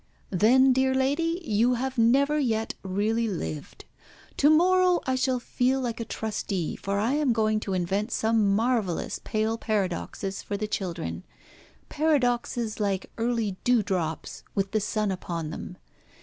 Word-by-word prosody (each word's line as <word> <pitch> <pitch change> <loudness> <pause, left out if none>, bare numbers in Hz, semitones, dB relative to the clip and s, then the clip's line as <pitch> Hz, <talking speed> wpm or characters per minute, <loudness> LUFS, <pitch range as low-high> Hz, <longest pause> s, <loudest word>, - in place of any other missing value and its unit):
"Then, 255 +7 +5
dear 260 0 +2
lady, 330 +6 +1
you 230 +4 +2
have 260 +2 -3
never 275 +6 +3
yet 225 -5 0
really 210 +4 0
lived. 80 - -5 0.5
To 290 - +5
morrow 360 +3 +4
I 260 - 0
shall 260 -1 +1
feel 255 +2 0
like 240 -3 -3
a 230 - -3
trustee, 205 -7 -3
for 200 +1 -3
I 225 +6 +1
am 290 -4 +2
going 215 -1 +1
to 200 -2 -4
invent 195 +5 -1
some 220 -3 +2
marvellous 220 -6 0
pale 220 +1 -1
paradoxes 195 -2 -2
for 200 - -4
the 215 +1 -3
children 180 -5 -4 0.6
paradoxes 245 -7 0
like 200 -2 -1
early 225 -4 0
dewdrops 190 -9 0
with 195 -1 0
the 215 - +2
sun 210 0 -1
upon 170 -4 -4
them. 180 +2 -7
225 Hz, 145 wpm, -26 LUFS, 200-260 Hz, 0.6 s, Then